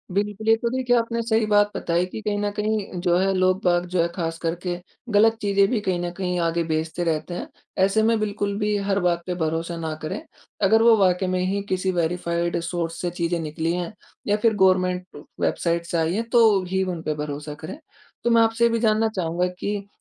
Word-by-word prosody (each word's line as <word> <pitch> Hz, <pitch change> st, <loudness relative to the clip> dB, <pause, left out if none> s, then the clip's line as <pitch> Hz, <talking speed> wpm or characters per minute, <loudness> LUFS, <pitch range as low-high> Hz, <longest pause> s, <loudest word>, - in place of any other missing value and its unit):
बिल्कुल। 205 Hz, +1 st, -2 dB
ये 225 Hz, -, +7 dB
तो 235 Hz, +1 st, -1 dB
देखिए 250 Hz, 0 st, +1 dB
आपने 230 Hz, 0 st, 0 dB
सही 225 Hz, -1 st, +1 dB
बात 205 Hz, -1 st, +3 dB
बताई 170 Hz, +2 st, 0 dB
कि 185 Hz, -, -7 dB
कहीं 210 Hz, -1 st, -1 dB
न 205 Hz, 0 st, -1 dB
कहीं 210 Hz, -4 st, -2 dB
जो 175 Hz, -1 st, +2 dB
है 195 Hz, +1 st, +2 dB
लोग 185 Hz, +1 st, +2 dB
बाग 175 Hz, -1 st, +2 dB
जो 180 Hz, -, +3 dB
है 170 Hz, -, +2 dB
ख़ासकर 165 Hz, 0 st, -2 dB
के 175 Hz, -1 st, -1 dB, 0.4 s
गलत 220 Hz, +2 st, +5 dB
चीज़ें 200 Hz, -1 st, +3 dB
भी 240 Hz, -, +1 dB
कहीं 185 Hz, -3 st, -1 dB
न 175 Hz, 0 st, -3 dB
कहीं 180 Hz, -2 st, -1 dB
आगे 170 Hz, 0 st, +1 dB
भेजते 160 Hz, +2 st, -2 dB
रहते 165 Hz, +1 st, -1 dB
हैं। 175 Hz, -, -5 dB, 0.4 s
ऐसे 205 Hz, +3 st, +2 dB
में 225 Hz, 0 st, +3 dB
बिल्कुल 205 Hz, -1 st, -2 dB
भी 210 Hz, 0 st, +1 dB
हर 195 Hz, 0 st, +2 dB
बात 175 Hz, -1 st, +1 dB
पे 180 Hz, -, -2 dB
भरोसा 165 Hz, 0 st, -2 dB
ना 160 Hz, -1 st, -3 dB
करें। 155 Hz, -, -4 dB, 0.5 s
अगर 220 Hz, +2 st, +4 dB
वो 230 Hz, -1 st, +7 dB
वाक़ई 185 Hz, -1 st, +2 dB
में 185 Hz, 0 st, 0 dB
ही 200 Hz, +2 st, -1 dB
किसी 185 Hz, 0 st, 0 dB
वेरिफ़ाइड 170 Hz, 0 st, -1 dB
सोर्स 165 Hz, -1 st, -3 dB
से 175 Hz, -, -1 dB
चीज़ें 170 Hz, 0 st, 0 dB
निकली 160 Hz, +1 st, -2 dB
हैं 180 Hz, +4 st, -3 dB, 0.3 s
या 205 Hz, -, +3 dB
फिर 225 Hz, +1 st, +3 dB
गवर्नमेंट 185 Hz, -1 st, +1 dB, 0.2 s
वेबसाइट 170 Hz, 0 st, 0 dB
से 170 Hz, -, -2 dB
आई 165 Hz, +1 st, +1 dB
हैं 225 Hz, +4 st, 0 dB
तो 220 Hz, -5 st, +5 dB
ही 190 Hz, +1 st, +1 dB
उन 180 Hz, -3 st, -3 dB
पे 155 Hz, -, -1 dB
भरोसा 150 Hz, 0 st, -5 dB
करें। 275 Hz, -, -7 dB, 0.5 s
तो 240 Hz, -, +2 dB
मैं 230 Hz, -, +6 dB
आपसे 225 Hz, +1 st, +2 dB
ये -, -, +4 dB
भी 230 Hz, 0 st, 0 dB
जानना 220 Hz, 0 st, +3 dB
चाहूँगा 175 Hz, 0 st, 0 dB
कि 205 Hz, -1 st, -3 dB
185 Hz, 220 wpm, -23 LUFS, 170-210 Hz, 0.5 s, ये